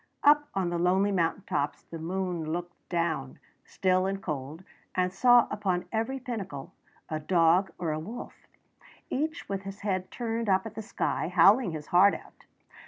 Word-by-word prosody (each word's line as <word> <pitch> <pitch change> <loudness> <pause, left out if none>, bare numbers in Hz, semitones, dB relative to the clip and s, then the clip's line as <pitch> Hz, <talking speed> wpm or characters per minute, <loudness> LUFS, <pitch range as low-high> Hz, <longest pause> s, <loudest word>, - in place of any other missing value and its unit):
Up 295 0 +6
on 185 -3 0
the 170 - -1
lonely 190 +3 +3
mountain 180 +1 0
tops 145 -6 -2
the 165 - -9
moon 175 -1 -2
looked 175 +1 -4
down, 165 -6 -1 0.3
still 185 0 +1
and 195 0 -2
cold, 150 -1 -5 0.3
and 185 0 +1
saw 245 +3 +6
upon 190 -4 -1
every 225 +5 -1
pinnacle 205 - -6 0.3
a 155 -1 -3
dog 170 +3 +3
or 165 -3 -2
a 155 - -2
wolf, 220 +10 -9 0.6
each 310 +4 -2
with 195 -1 -3
his 195 +1 -8
head 185 -3 -1
turned 230 -2 -3
up 190 +1 +3
at 220 - -6
the 220 - -5
sky, 215 - -2
howling 185 +4 +5
his 150 -2 -6
heart 195 +3 +6
out. - - -14
185 Hz, 170 wpm, -28 LUFS, 170-210 Hz, 0.6 s, Up